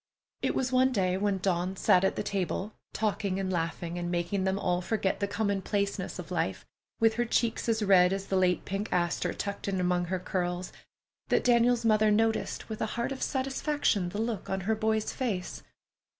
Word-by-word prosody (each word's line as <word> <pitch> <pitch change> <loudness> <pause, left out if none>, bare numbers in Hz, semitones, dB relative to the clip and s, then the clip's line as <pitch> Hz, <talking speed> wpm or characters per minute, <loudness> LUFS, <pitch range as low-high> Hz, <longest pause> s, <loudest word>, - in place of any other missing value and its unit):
It - - 0
was 260 -1 0
one 260 +1 +4
day 185 -6 +1
when 200 0 +1
Dawn 185 0 0
sat 190 -1 +4
at 190 - +2
the - - -2
table, 195 +1 -2 0.2
talking 200 -3 -1
and 190 -1 -1
laughing 170 +1 -2
and 175 0 -3
making 175 +2 -1
them 190 0 +1
all 180 -2 0
forget 195 0 -1
the 200 - 0
common 200 -1 -1
placeness 200 0 -2
of - - -8
life, - - -1 0.3
with 225 -1 +4
her 240 - +3
cheeks 230 0 0
as 220 -1 +1
red 185 -3 +6
as 195 0 -2
the 195 - -2
late 185 -1 +2
pink 195 +2 -3
aster 175 0 0
tucked 200 0 -5
in 195 -1 0
among 180 0 +1
her 185 +2 -1
curls, 180 0 -3 0.5
that - - +2
Daniel's 240 -1 +3
mother 215 -1 +4
noticed 225 +1 +1
with 220 -1 -6
a 220 - +1
heart 235 +3 -1
of 270 - -5
satisfaction 265 - 0
the 195 - -6
look 225 -3 -3
on 190 0 -1
her 215 +5 +1
boy's 220 0 0
face. 205 -9 -3
200 Hz, 195 wpm, -29 LUFS, 180-220 Hz, 0.5 s, red